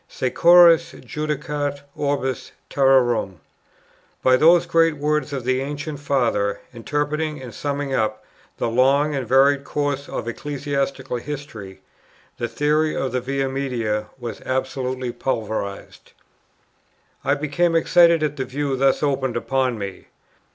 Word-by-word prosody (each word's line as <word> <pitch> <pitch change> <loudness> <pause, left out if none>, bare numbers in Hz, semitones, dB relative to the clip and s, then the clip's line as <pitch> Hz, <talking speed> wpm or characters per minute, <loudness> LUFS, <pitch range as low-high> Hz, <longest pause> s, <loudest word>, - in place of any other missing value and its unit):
"Securus 170 +5 +5
judicat 150 -1 -4
orbis 140 -3 -2 0.2
terrarum!" 120 - +2 0.8
By 130 0 +5
those 165 +5 +5
great 165 -2 +2
words 150 0 -1
of 135 -3 -4
the 130 +1 0
ancient 145 +1 -5
Father, 120 -8 0
interpreting 150 +5 -2
and 125 -3 -9
summing 140 +2 -3
up 110 -3 -1 0.3
the - - -1
long 135 +5 +3
and 135 -4 -3
varied 135 +2 +4
course 145 -1 -2
of - - -5
ecclesiastical 140 0 -3
history, 120 -8 -8 0.6
the 120 - -1
theory 150 +6 +1
of 130 - -2
the 125 0 -1
Via 135 +2 -1
Media 120 -6 -2
was 120 -3 -7
absolutely 130 -1 -2
pulverized. 110 -5 -4 1.1
I 140 +2 +2
became 155 +4 0
excited 170 0 +4
at 150 -1 -1
the 130 - -2
view 135 +2 -2
thus 135 +2 +2
opened 135 -4 0
upon 130 -1 0
me. 100 -2 -7
135 Hz, 125 wpm, -22 LUFS, 125-145 Hz, 1.1 s, Securus